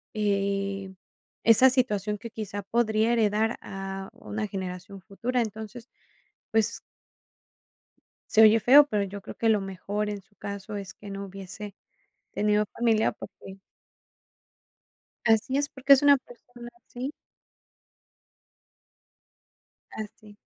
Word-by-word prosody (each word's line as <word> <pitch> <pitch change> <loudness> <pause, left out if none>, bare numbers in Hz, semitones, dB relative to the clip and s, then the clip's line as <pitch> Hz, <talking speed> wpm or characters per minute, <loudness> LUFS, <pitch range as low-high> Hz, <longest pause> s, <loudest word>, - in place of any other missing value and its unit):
eh, 195 -1 -1 0.5
esa 230 +3 +7
situación, 210 -5 0
que 230 +3 -9
quizá 205 -2 -5
podría 220 +1 +1
heredar 220 0 +1
a 195 0 -6
una 215 0 -5
generación 190 0 -6
futura. 235 +6 -2
Entonces, 220 +2 -8 0.6
pues 220 -1 +1 1.5
se 220 - +6
oye 220 +1 +7
feo, 280 +6 +8
pero 210 -7 0
yo 200 +1 -6
creo - - -9
que 225 - +1
lo 210 -2 +3
mejor 200 +2 -3
en 205 -1 -5
su 200 +2 -34
caso 200 +1 -6
es 195 -2 -6
que 205 - -11
no 195 0 -5
hubiese 195 +1 -9 0.6
tenido 210 0 +2
familia, 225 -1 +1
porque 195 -1 -11 1.7
Así 225 +4 +3
es, 285 0 0
porque 275 +1 +5
es 275 - +4
una 285 -1 +7
persona 245 -1 -13 0.2
así. 255 +3 -5 2.8
Así. 215 0 -9
210 Hz, 115 wpm, -27 LUFS, 200-230 Hz, 2.8 s, feo